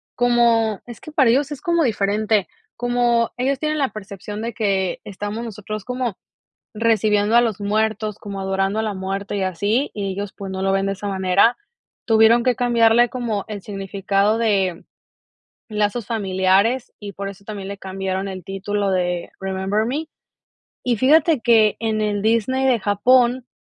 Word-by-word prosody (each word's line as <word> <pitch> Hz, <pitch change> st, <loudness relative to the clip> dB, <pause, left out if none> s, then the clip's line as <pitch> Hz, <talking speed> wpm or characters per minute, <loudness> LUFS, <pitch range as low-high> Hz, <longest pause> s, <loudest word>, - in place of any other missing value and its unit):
como 235 Hz, -3 st, +2 dB
es 235 Hz, -3 st, -9 dB
que 310 Hz, -, -10 dB
para 270 Hz, -6 st, +4 dB
ellos 275 Hz, +5 st, +2 dB
es 290 Hz, -, -6 dB
como 340 Hz, -2 st, +1 dB
diferente, 210 Hz, -2 st, +1 dB, 0.3 s
como 240 Hz, -1 st, +1 dB
ellos 265 Hz, +2 st, 0 dB
tienen 305 Hz, 0 st, -1 dB
la 275 Hz, -3 st, +1 dB
percepción 205 Hz, 0 st, -7 dB
de 230 Hz, +1 st, -4 dB
que 195 Hz, -4 st, 0 dB
estamos 205 Hz, +3 st, -5 dB
nosotros 215 Hz, -1 st, -6 dB
como 250 Hz, -4 st, -3 dB, 0.6 s
recibiendo 215 Hz, -1 st, +2 dB
a 240 Hz, -, +7 dB
los 220 Hz, -4 st, -1 dB
muertos, 215 Hz, 0 st, -1 dB
como 200 Hz, -1 st, -7 dB
adorando 195 Hz, +2 st, -1 dB
a 220 Hz, -, +1 dB
la 215 Hz, -2 st, -2 dB
muerte 195 Hz, +2 st, -4 dB
y 195 Hz, -, -1 dB
así, 205 Hz, -, 0 dB
y 200 Hz, -2 st, -3 dB
ellos 200 Hz, 0 st, -5 dB
pues 195 Hz, -1 st, -7 dB
no 190 Hz, 0 st, -4 dB
lo 195 Hz, 0 st, +1 dB
ven 195 Hz, 0 st, +1 dB
de 195 Hz, -, 0 dB
esa 200 Hz, +1 st, -6 dB
manera, 190 Hz, -, +3 dB, 0.5 s
tuvieron 225 Hz, +1 st, +5 dB
que 250 Hz, -2 st, +2 dB
cambiarle 240 Hz, -1 st, +4 dB
como 230 Hz, -6 st, -3 dB
el 205 Hz, -2 st, -5 dB
significado 195 Hz, +1 st, 0 dB
de 195 Hz, -6 st, 0 dB, 0.9 s
lazos 210 Hz, +1 st, -1 dB
familiares 200 Hz, +3 st, +1 dB
y 205 Hz, -1 st, -8 dB
por 195 Hz, +1 st, -5 dB
eso 200 Hz, 0 st, -13 dB
también 200 Hz, -2 st, -6 dB
le 200 Hz, -, -6 dB
cambiaron 190 Hz, 0 st, -4 dB
el 185 Hz, -2 st, -7 dB
título 195 Hz, +1 st, -2 dB
de 180 Hz, -1 st, -1 dB
Remember 195 Hz, +3 st, -1 dB
Me, 300 Hz, +6 st, -3 dB, 0.8 s
y 240 Hz, -2 st, +1 dB
fíjate 305 Hz, +1 st, +4 dB
que, 225 Hz, -3 st, +4 dB
en 220 Hz, -1 st, -1 dB
el 205 Hz, -1 st, -1 dB
Disney 230 Hz, +4 st, +1 dB
de 250 Hz, -3 st, +3 dB
Japón 245 Hz, +5 st, +3 dB
210 Hz, 170 wpm, -21 LUFS, 195-235 Hz, 0.9 s, a